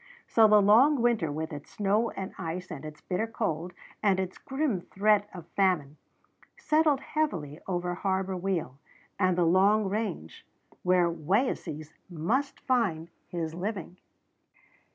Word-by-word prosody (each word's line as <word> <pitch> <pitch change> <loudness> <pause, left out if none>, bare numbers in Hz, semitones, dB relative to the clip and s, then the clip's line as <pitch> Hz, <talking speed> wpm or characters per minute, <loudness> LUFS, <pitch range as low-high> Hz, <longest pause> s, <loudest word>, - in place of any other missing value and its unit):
So 225 -1 +5
the 210 -1 +6
long 250 +8 +6
winter, 225 -11 +2
with 155 +1 -4
its 145 0 -8
snow 210 +3 +1
and 190 -1 -6
ice 180 +1 -5
and 150 -3 -7
its 150 0 -9
bitter 195 +5 -2
cold 180 -7 -3 0.3
and 195 -3 +3
its 185 -1 -4
grim 270 - -1
threat 205 +2 +2
of 175 -3 -9
famine, 170 -7 +1 0.6
settled 305 -3 +2
heavily 170 - -2
over 180 -1 -1
Harbor 190 +1 -1
Weal 175 -8 -2 0.4
and 185 -2 +2
the 175 - +3
Long 195 +5 +4
Range 190 - -4 0.4
where 180 -1 +3
Wayeeses 160 - -1 0.2
must 220 - -1
find 175 -11 0 0.2
his 165 -2 -4
living. 185 0 -5
190 Hz, 135 wpm, -28 LUFS, 165-215 Hz, 0.6 s, the